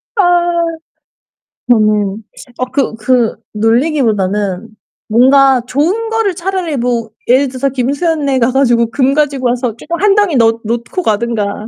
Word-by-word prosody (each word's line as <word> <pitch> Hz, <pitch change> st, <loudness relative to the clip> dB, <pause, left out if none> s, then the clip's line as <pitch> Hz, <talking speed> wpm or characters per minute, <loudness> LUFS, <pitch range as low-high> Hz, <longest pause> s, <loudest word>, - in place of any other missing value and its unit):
아. 410 Hz, -, +3 dB, 1.5 s
음. 215 Hz, -2 st, +1 dB, 0.3 s
아 255 Hz, -, -1 dB
그 270 Hz, -5 st, 0 dB
그 235 Hz, +1 st, +1 dB, 0.2 s
놀리기 240 Hz, +8 st, +1 dB
보다는 205 Hz, -2 st, -1 dB, 0.4 s
뭔가 265 Hz, +3 st, +4 dB
좋은 365 Hz, -, -1 dB
거를 445 Hz, -5 st, 0 dB
차라리 350 Hz, -5 st, -3 dB
뭐 235 Hz, -2 st, -1 dB, 0.2 s
예를 260 Hz, +3 st, +3 dB
들어서 260 Hz, +1 st, -2 dB
김수현네 280 Hz, +2 st, -1 dB
가 240 Hz, +1 st, +2 dB
가지고 240 Hz, -3 st, +2 dB
금 270 Hz, +2 st, +1 dB
가지고 280 Hz, -4 st, 0 dB
와서 245 Hz, -2 st, -2 dB
쪼금 335 Hz, +8 st, -5 dB
1 405 Hz, -1 st, +4 dB
덩이 410 Hz, -8 st, +2 dB
넣 230 Hz, -1 st, +3 dB
놓고 235 Hz, -, -3 dB
가든가. 215 Hz, -2 st, -2 dB
250 Hz, 255 characters per minute, -13 LUFS, 225-290 Hz, 1.5 s, 뭔가